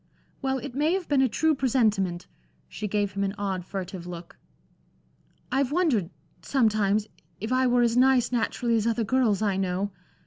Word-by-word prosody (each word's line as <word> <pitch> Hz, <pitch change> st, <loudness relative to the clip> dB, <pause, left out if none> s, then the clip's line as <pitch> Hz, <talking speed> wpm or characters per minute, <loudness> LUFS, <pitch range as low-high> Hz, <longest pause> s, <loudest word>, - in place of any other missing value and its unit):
"Well, 265 Hz, -1 st, 0 dB
it 245 Hz, -, -7 dB
may 300 Hz, +5 st, +1 dB
have 375 Hz, -2 st, -2 dB
been 280 Hz, -2 st, +3 dB
a 260 Hz, -, +3 dB
true 315 Hz, +7 st, +2 dB
presentiment." 215 Hz, -10 st, +1 dB, 0.4 s
She 215 Hz, -, -5 dB
gave 205 Hz, 0 st, 0 dB
him 200 Hz, +1 st, -2 dB
an 195 Hz, +1 st, -2 dB
odd, 195 Hz, -3 st, -2 dB
furtive 185 Hz, -1 st, -6 dB
look. 170 Hz, -1 st, -9 dB, 1.2 s
"I've 270 Hz, 0 st, +1 dB
wondered 290 Hz, -, +1 dB, 0.3 s
sometimes 215 Hz, -5 st, +1 dB, 0.3 s
if 220 Hz, +4 st, -4 dB
I 255 Hz, 0 st, +3 dB
were 245 Hz, 0 st, +3 dB
as 235 Hz, -1 st, +2 dB
nice 255 Hz, -2 st, +4 dB
naturally 235 Hz, 0 st, 0 dB
as 220 Hz, +1 st, 0 dB
other 230 Hz, 0 st, +1 dB
girls 220 Hz, -3 st, +1 dB
I 200 Hz, -3 st, +1 dB
know. 190 Hz, +1 st, -1 dB
225 Hz, 170 wpm, -26 LUFS, 195-260 Hz, 1.2 s, nice